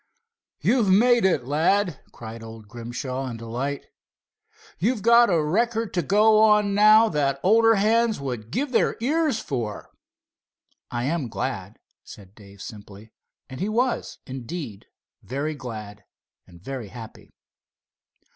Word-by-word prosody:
"You've 235 Hz, -6 st, +2 dB
made 235 Hz, +3 st, +4 dB
it, 160 Hz, -9 st, +1 dB
lad!" 165 Hz, +4 st, +1 dB
cried 115 Hz, 0 st, -9 dB
old 110 Hz, -1 st, -11 dB
Grimshaw 125 Hz, +4 st, -5 dB
in 120 Hz, -2 st, -6 dB
delight. 125 Hz, +5 st, -4 dB, 0.9 s
"You've 215 Hz, +4 st, 0 dB
got 235 Hz, 0 st, +6 dB
a 165 Hz, -4 st, +2 dB
record 225 Hz, +7 st, 0 dB
to 175 Hz, -, +1 dB
go 210 Hz, +6 st, +4 dB
on 210 Hz, -2 st, +4 dB
now 215 Hz, +2 st, +6 dB
that 140 Hz, -4 st, 0 dB
older 225 Hz, +3 st, +5 dB
hands 220 Hz, +2 st, +2 dB
would 125 Hz, -5 st, -5 dB
give 270 Hz, -, -2 dB
their 235 Hz, -, +1 dB
ears 295 Hz, 0 st, 0 dB
for." 120 Hz, -, -5 dB, 1.0 s
"I 120 Hz, 0 st, -3 dB
am 145 Hz, -2 st, -2 dB
glad," -, -, -5 dB, 0.3 s
said 95 Hz, -2 st, -14 dB
Dave 100 Hz, -2 st, -14 dB
simply, 105 Hz, 0 st, -12 dB, 0.3 s
and 130 Hz, -, -9 dB
he 195 Hz, +4 st, -1 dB
was, 245 Hz, +3 st, -1 dB
indeed, 130 Hz, -, -7 dB, 0.3 s
very 140 Hz, +5 st, -3 dB
glad 110 Hz, -7 st, -8 dB, 0.4 s
and 85 Hz, -1 st, -16 dB
very 130 Hz, +3 st, -6 dB
happy. 115 Hz, +1 st, -12 dB
150 Hz, 130 wpm, -24 LUFS, -, 1.0 s, got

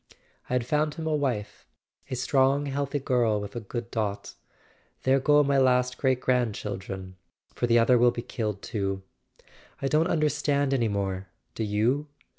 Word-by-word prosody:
" -, -, -33 dB
I -, -, -2 dB
had 125 Hz, -2 st, +1 dB
found 150 Hz, +3 st, 0 dB
him 160 Hz, -1 st, -5 dB
a 155 Hz, -1 st, +1 dB
wife—a 130 Hz, -2 st, -5 dB
strong 135 Hz, +3 st, +2 dB
healthy 140 Hz, 0 st, -2 dB
girl 120 Hz, -6 st, +1 dB
with 100 Hz, +1 st, -7 dB
a -, -, -2 dB
good 115 Hz, +2 st, -6 dB
dot. 105 Hz, -3 st, -3 dB, 0.7 s
There 135 Hz, +1 st, +4 dB
go 150 Hz, +2 st, +4 dB
my 140 Hz, -1 st, +2 dB
last 125 Hz, -1 st, +2 dB
great 130 Hz, -2 st, +2 dB
grandchildren! 100 Hz, -7 st, -2 dB, 0.4 s
For 120 Hz, -, -1 dB
the 120 Hz, 0 st, +4 dB
other 120 Hz, +1 st, +5 dB
will 120 Hz, +1 st, +6 dB
be 120 Hz, 0 st, -4 dB
killed 105 Hz, -4 st, -4 dB
too. 95 Hz, -4 st, -3 dB, 0.8 s
I 135 Hz, -, -1 dB
don't 155 Hz, +4 st, +2 dB
understand 145 Hz, -3 st, +1 dB
any 120 Hz, -4 st, +2 dB
more, 95 Hz, -2 st, -2 dB, 0.3 s
do 115 Hz, -, -3 dB
you?" 115 Hz, +8 st, +1 dB
125 Hz, 165 wpm, -27 LUFS, 105-140 Hz, 0.8 s, will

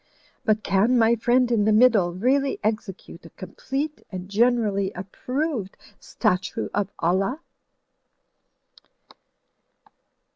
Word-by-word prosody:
But 215 Hz, -1 st, +1 dB
can 215 Hz, +6 st, +2 dB
my 225 Hz, 0 st, +4 dB
friend 245 Hz, +2 st, +2 dB
in 215 Hz, -3 st, +2 dB
the 215 Hz, -, +3 dB
middle 215 Hz, -5 st, +4 dB
really 265 Hz, +9 st, 0 dB
execute 205 Hz, -5 st, -4 dB
a -, -, -12 dB
complete 270 Hz, -, -5 dB
and 185 Hz, -1 st, -7 dB
generally 210 Hz, -3 st, +1 dB
approved 245 Hz, -, -4 dB, 0.2 s
statue 180 Hz, +1 st, -2 dB
of 205 Hz, -1 st, -1 dB
Allah?" 195 Hz, -, 0 dB
215 Hz, 100 wpm, -24 LUFS, 195-250 Hz, 0.2 s, my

